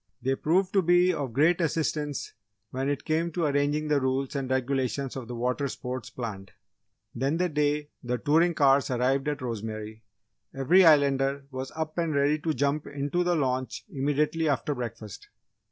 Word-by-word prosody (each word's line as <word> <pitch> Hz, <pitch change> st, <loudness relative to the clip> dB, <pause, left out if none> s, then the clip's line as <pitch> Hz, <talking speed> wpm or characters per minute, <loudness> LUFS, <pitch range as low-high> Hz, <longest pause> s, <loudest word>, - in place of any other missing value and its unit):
They 130 Hz, +2 st, 0 dB
proved 180 Hz, +7 st, +1 dB
to 195 Hz, -, +4 dB
be 175 Hz, +1 st, +4 dB
of 140 Hz, -6 st, -3 dB
great 160 Hz, +8 st, +3 dB
assistance 150 Hz, -3 st, -2 dB, 0.4 s
when 135 Hz, +2 st, -2 dB
it 145 Hz, -, -3 dB
came 165 Hz, +2 st, 0 dB
to 170 Hz, -1 st, 0 dB
arranging 145 Hz, +1 st, +1 dB
the 150 Hz, -2 st, +2 dB
rules 130 Hz, +1 st, -1 dB
and 135 Hz, -2 st, -2 dB
regulations 130 Hz, 0 st, -1 dB
of 130 Hz, -3 st, -6 dB
the 120 Hz, -, -6 dB
water 125 Hz, +4 st, -1 dB
sports 125 Hz, -1 st, -6 dB
planned. 100 Hz, -6 st, -7 dB, 0.6 s
Then 135 Hz, +6 st, 0 dB
the 180 Hz, +1 st, +1 dB
day 150 Hz, -1 st, 0 dB
the 125 Hz, 0 st, -1 dB
touring 160 Hz, +7 st, +2 dB
cars 140 Hz, -1 st, +4 dB
arrived 130 Hz, +3 st, +1 dB
at 145 Hz, -2 st, -2 dB
Rosemary, 110 Hz, -2 st, -5 dB, 0.5 s
every 165 Hz, +8 st, +5 dB
Islander 140 Hz, -3 st, +4 dB
was 130 Hz, 0 st, -5 dB
up 160 Hz, +1 st, -3 dB
and 165 Hz, -3 st, 0 dB
ready 145 Hz, +2 st, +2 dB
to 160 Hz, +1 st, -1 dB
jump 145 Hz, +3 st, 0 dB
into 145 Hz, +5 st, -1 dB
the 175 Hz, 0 st, +1 dB
launch 130 Hz, -3 st, -2 dB
immediately 150 Hz, +2 st, 0 dB
after 140 Hz, +1 st, 0 dB
breakfast. 115 Hz, -6 st, -7 dB
140 Hz, 170 wpm, -27 LUFS, 130-155 Hz, 0.6 s, every